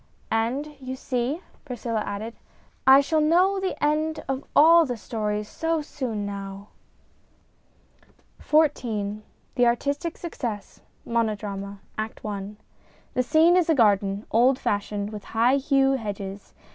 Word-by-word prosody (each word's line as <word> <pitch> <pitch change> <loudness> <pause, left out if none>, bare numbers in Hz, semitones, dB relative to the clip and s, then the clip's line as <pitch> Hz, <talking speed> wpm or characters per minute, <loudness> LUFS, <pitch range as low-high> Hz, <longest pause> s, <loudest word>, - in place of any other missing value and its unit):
" - - -35 0.2
And 290 +5 -5
you 260 -1 -5
see," 260 +6 -2 0.2
Priscilla 235 -5 -3
added, 215 +3 -5 0.3
" - - -37
I - - +6
shall 310 +3 +1
know 360 +6 +3
the 380 -1 -2
end 310 +1 0
of 270 0 -2
all 330 +3 +8
the 250 -6 -3
stories 210 -2 -3
so 325 +3 -1
soon 240 -8 -4
now." 200 0 -7 1.7
XIV 225 -9 +1 0.3
THE 245 -1 +3
ARTISTIC 280 +7 -1
SUCCESS 235 - -6 0.2
(Monodrama) 205 -3 -2 0.2
ACT 220 +1 -4
I 205 0 -5 0.6
The 255 - +2
scene 315 +8 +4
is 360 -2 +2
a 320 - +4
garden, 200 -3 +2
old 250 +4 +4
fashioned, 205 -2 -2
with 210 -2 -7
high 245 +5 +4
yew 270 -1 +4
hedges. 205 -5 -5
240 Hz, 135 wpm, -25 LUFS, 210-295 Hz, 1.7 s, all